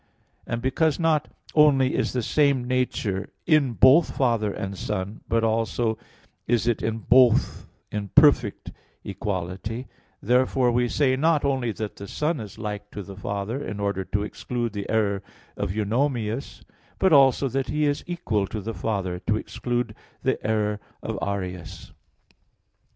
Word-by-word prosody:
And 115 +1 -3
because 145 +4 +1
not 155 -2 +2 0.3
only 140 -4 +5
is - - 0
the 125 -2 -1
same 140 -2 +2
nature 125 -6 -1 0.2
in 150 -6 +3
both 135 +8 +5
Father 115 -5 +2
and 100 0 -5
Son, 100 +1 -4
but 115 0 +1
also 110 0 0 0.5
is 120 -1 +2
it 120 -2 +1
in 110 0 -1
both 120 +1 +3 0.2
in 105 -1 -3
perfect 130 -8 +4 0.3
equality, 100 +4 -4 0.3
therefore 125 +2 +2
we 120 +1 +2
say 130 -1 +2
not 155 +2 +2
only 130 -4 0
that 105 0 -5
the 100 - -8
Son 150 - -1
is 105 -2 -8
like 105 -1 -5
to 105 - -7
the 100 +1 -10
Father, 100 +7 -3
in 105 - -5
order 100 -1 -1
to 100 +2 -2
exclude 120 +2 -4
the 100 -1 -5
error 100 -3 +1 0.3
of - - -2
Eunomius, 115 +3 -1 0.3
but 190 -3 +3
also 135 -1 +5
that 135 +1 -2
He 150 +1 0
is 145 0 0
equal 115 - -1
to 110 - -5
the 110 +3 -5
Father 95 -5 -2
to 110 - +2
exclude 120 0 -3 0.3
the - - 0
error 105 -1 0 0.2
of - - -3
Arius. 90 -4 -5
115 Hz, 150 wpm, -25 LUFS, 105-130 Hz, 0.5 s, only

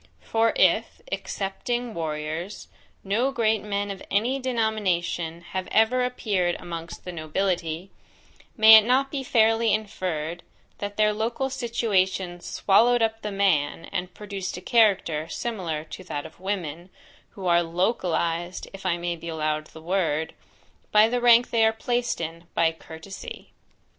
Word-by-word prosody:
For 225 0 +2
if, - - +2
excepting 240 +5 -3
warriors, 160 +4 -4 0.3
no 230 +7 +1
great 220 -4 +1
men 205 -1 -2
of 195 - -8
any 235 +7 +1
denomination, 195 -9 -1
have 185 -1 -3
ever 225 +3 +3
appeared 200 -8 0
amongst 170 -1 -8
the 180 - -4
nobility, 170 +1 -2 0.7
may 220 0 +10
it 215 - +6
not 265 +4 +2
be 280 - -2
fairly 225 -2 +3
inferred, 175 -6 -2 0.4
that 205 0 -5
their 210 0 +3
local 235 +5 -2
situation 195 -8 0
swallowed 230 +7 +3
up 225 0 -1
the 210 - -4
man, 175 -7 +1
and 180 -1 -3
produced 200 -3 -5
a - - -8
character 190 -9 +2
similar 175 -9 -3
to 185 - -7
that 145 -4 -4
of 160 - -12
women, 180 -3 -4 0.5
who 190 - -6
are 175 -1 +4
LOCALIZED, 175 -1 -1
if 195 -1 -5
I 175 -2 +1
may 175 0 -2
be 170 0 -8
allowed 155 -1 -2
the 160 - -13
word, 165 -3 0 0.6
by 215 +1 +6
the 245 +1 0
rank 240 0 +6
they 230 -1 +3
are 220 - +5
placed 240 +2 -1
in, 165 +1 -5
by 165 -1 +3
COURTESY? 165 +3 -10
195 Hz, 145 wpm, -25 LUFS, 170-225 Hz, 0.7 s, may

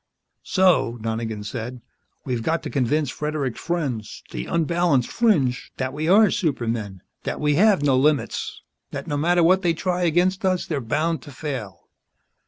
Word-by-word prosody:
"So," 180 -11 +2
Donegan 110 -1 -3
said, 115 +4 -5 0.5
"we've 125 -3 -2
got 160 +8 -1
to - - -5
convince 140 +2 +1
Fredericks' 150 -5 -3
friends 135 -11 -3
the - - -5
unbalanced 170 -5 +1
fringe 150 - +1
that 130 0 -2
we 155 +2 -2
are 210 +4 +6
supermen, 115 - -2 0.2
that - - -4
we 150 0 +2
have 195 0 +4
no 140 -3 +4
limits, 145 +2 0 0.3
that - - -6
no 145 - -2
matter 170 +4 +3
what 185 +3 +4
they 170 -3 +1
try 180 +2 -1
against 180 +4 +2
us 185 -1 +1
they're 155 -7 -2
bound 155 +8 -1
to 145 - -11
fail." 125 - -6
150 Hz, 160 wpm, -23 LUFS, 125-175 Hz, 0.5 s, are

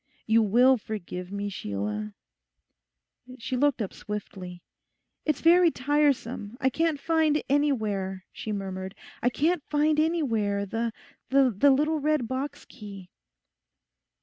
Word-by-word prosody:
You 225 +1 +4
will 245 +5 +5
forgive 180 -4 -6
me, 200 0 -3
Sheila?' 105 - -4 1.2
She 260 +2 -4
looked 265 -2 +2
up 195 - -6
swiftly. 185 -4 -7 0.6
'It's 305 - 0
very 345 +1 +6
tiresome, 260 -6 0
I 265 - +2
can't 320 0 0
find 315 -1 +2
anywhere,' 215 -10 0
she 215 - -5
murmured, 190 -1 -5 0.3
'I 245 - +3
can't 310 +5 0
find 300 +1 +2
anywhere 230 -12 +1
the—the 235 +3 +1
little 300 +3 +2
red 300 -4 +1
box 260 +4 -4
key. 200 -6 -11
240 Hz, 115 wpm, -27 LUFS, 200-290 Hz, 1.2 s, very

